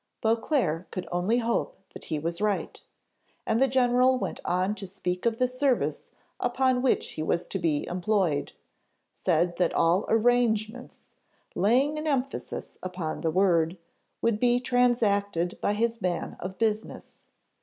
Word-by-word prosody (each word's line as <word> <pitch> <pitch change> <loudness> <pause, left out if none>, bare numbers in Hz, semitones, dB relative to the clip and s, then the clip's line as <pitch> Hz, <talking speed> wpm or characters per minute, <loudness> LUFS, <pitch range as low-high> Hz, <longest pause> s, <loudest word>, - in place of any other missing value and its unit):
Beauclerc 225 - 0
could 180 -2 -5
only 180 +7 +1
hope 235 - -1 0.2
that - - -10
he 155 - -2
was 170 +4 -3
right; 210 -2 -1 0.6
and 225 +2 +1
the 270 - +5
general 255 0 +3
went - - -4
on 185 +3 0
to 200 -2 -7
speak 180 +1 -3
of 225 -1 0
the 255 - +2
service 255 +1 -1 0.3
upon 250 +1 +1
which 260 - +1
he - - -5
was 170 +2 0
to 195 - -4
be 155 -4 0
employed: 180 -4 0 0.6
said 170 0 0
that 180 -2 +1
all 170 +4 +3
arrangements, 230 0 0 0.4
laying 265 +10 +2
an 310 - -4
emphasis 270 -2 -3
upon 180 -4 -4
the 165 - 0
word, 170 -1 +2 0.5
would 230 -2 +2
be 245 0 +3
transacted 205 -8 +1
by 205 - +1
his 230 +1 -1
man 180 -2 -2
of 185 +1 -6
business. 220 -1 -3
215 Hz, 145 wpm, -27 LUFS, 180-245 Hz, 0.6 s, the